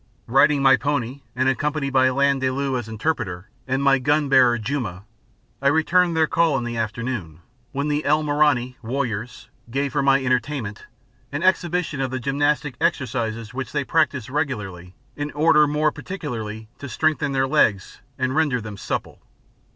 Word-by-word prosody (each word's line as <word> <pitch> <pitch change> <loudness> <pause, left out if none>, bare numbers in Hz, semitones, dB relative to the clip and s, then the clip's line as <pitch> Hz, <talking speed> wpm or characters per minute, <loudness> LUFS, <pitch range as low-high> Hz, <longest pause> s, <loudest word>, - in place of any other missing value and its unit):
Riding 135 +3 +4
my 135 0 +6
pony 140 -2 -2
and 130 +1 +1
accompanied 140 +1 -1
by 130 -1 +5
Landaalu 135 0 +1
as 115 -2 -7
interpreter, 110 - -3 0.2
and 135 +1 0
my 135 -1 +4
gun 145 +2 +1
bearer 125 -3 +5
Juma, 110 -6 -4 0.6
I 140 - +2
returned 165 +3 +3
their 160 - +5
call 160 -2 +2
in 120 - -2
the 120 0 -4
afternoon, 110 -7 -4 0.3
when 140 +2 -2
the 150 0 0
elmorani 145 -4 +2
(warriors) 120 -2 -4 0.2
gave 140 +3 -1
for - - 0
my 135 -1 +3
entertainment 125 -4 -2 0.4
an - - -3
exhibition 175 -5 +1
of 130 - -1
the 130 +1 -3
gymnastic 140 0 0
exercises 115 -4 -1
which 130 -2 -5
they 145 -1 0
practise 140 -5 +1
regularly 105 - -4 0.2
in 145 0 -3
order 150 0 +4
more 150 +1 +1
particularly 120 - -6
to 140 - -7
strengthen 155 0 0
their 135 -1 +1
legs 110 -9 +1 0.2
and 130 +1 -1
render 150 -6 +2
them 105 -2 -8
supple. - - -4
135 Hz, 155 wpm, -22 LUFS, 120-145 Hz, 0.6 s, my